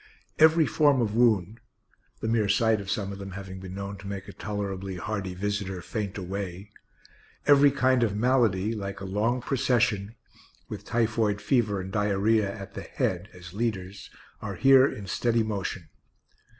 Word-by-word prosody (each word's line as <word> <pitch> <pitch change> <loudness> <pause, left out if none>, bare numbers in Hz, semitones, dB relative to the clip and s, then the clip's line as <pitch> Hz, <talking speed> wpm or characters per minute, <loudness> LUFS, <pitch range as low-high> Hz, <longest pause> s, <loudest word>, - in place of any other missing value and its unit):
Every 160 +1 +6
form 140 +2 +3
of 110 -3 0
wound 110 -3 +2 0.6
(the - - -2
mere 110 -3 +1
sight 110 +1 +3
of 100 - -8
some 100 -1 -2
of 100 - -9
them 95 -1 -7
having 95 -1 -7
been 95 0 -8
known 100 0 -5
to 100 - -10
make 100 -1 -6
a - - -9
tolerably 100 -2 -4
hardy 95 -1 -4
visitor 100 -1 -3
faint 100 +4 -4
away), 95 +1 -5 0.7
every 145 0 +7
kind 130 -2 +2
of 110 -4 +1
malady, 110 -3 +2
like 100 -3 -5
a 100 - -6
long 110 +6 0
procession, 120 -5 0 0.5
with - - -8
typhoid 110 -3 +1
fever 105 -4 +1
and 95 0 -6
diarrhoea 105 0 +1
at 95 -1 -9
the - - -6
head 90 +3 -2
as 90 -1 -12
leaders, 100 -3 -3 0.3
are - - -5
here 135 0 +6
in 105 -7 -6
steady 115 +4 +1
motion. 100 -5 -4
105 Hz, 165 wpm, -27 LUFS, 95-115 Hz, 0.7 s, every